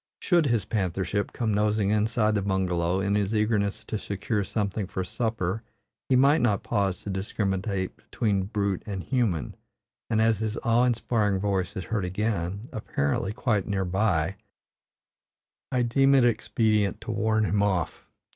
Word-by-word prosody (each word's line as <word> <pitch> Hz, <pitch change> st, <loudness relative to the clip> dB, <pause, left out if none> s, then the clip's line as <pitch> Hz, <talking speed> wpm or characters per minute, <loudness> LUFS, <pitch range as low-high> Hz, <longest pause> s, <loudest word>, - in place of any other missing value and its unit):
Should 170 Hz, -5 st, +3 dB
his 115 Hz, -7 st, +1 dB
panthership 100 Hz, -1 st, -1 dB
come 110 Hz, -3 st, -1 dB
nosing 105 Hz, 0 st, +2 dB
inside 110 Hz, +1 st, +2 dB
the 105 Hz, -, +1 dB
bungalow, 95 Hz, -2 st, 0 dB
in 100 Hz, +1 st, 0 dB
his 105 Hz, +1 st, +1 dB
eagerness 105 Hz, -2 st, 0 dB
to 110 Hz, -, -3 dB
secure 100 Hz, +2 st, -2 dB
something 100 Hz, -1 st, -2 dB
for 95 Hz, -, -3 dB
supper 110 Hz, -1 st, -2 dB, 0.5 s
he 130 Hz, -, +4 dB
might 140 Hz, +4 st, +5 dB
not 105 Hz, -5 st, +1 dB
pause 100 Hz, -4 st, -1 dB
to 100 Hz, -, -4 dB
discriminate 95 Hz, -1 st, -2 dB
between 100 Hz, -4 st, -1 dB
brute 100 Hz, -2 st, -1 dB
and 95 Hz, -3 st, -4 dB
human; 110 Hz, -, 0 dB, 0.6 s
and 110 Hz, -2 st, +2 dB
as 110 Hz, -2 st, +3 dB
his 110 Hz, +1 st, -2 dB
awe 120 Hz, +1 st, +4 dB
inspiring 110 Hz, -4 st, +1 dB
voice 95 Hz, -3 st, -1 dB
is 95 Hz, -, -3 dB
heard 110 Hz, -2 st, -2 dB
again, 100 Hz, +1 st, -2 dB
apparently 95 Hz, -2 st, -1 dB
quite 110 Hz, -3 st, 0 dB
near 95 Hz, -2 st, 0 dB
by, 95 Hz, -1 st, +1 dB, 1.3 s
I 125 Hz, -1 st, +2 dB
deem 135 Hz, +3 st, +4 dB
it 130 Hz, -3 st, +5 dB
expedient 110 Hz, -3 st, +1 dB
to -, -, -5 dB
warn 110 Hz, 0 st, +1 dB
him 105 Hz, 0 st, +1 dB
off. 95 Hz, -5 st, -1 dB
105 Hz, 155 wpm, -27 LUFS, 95-110 Hz, 1.3 s, might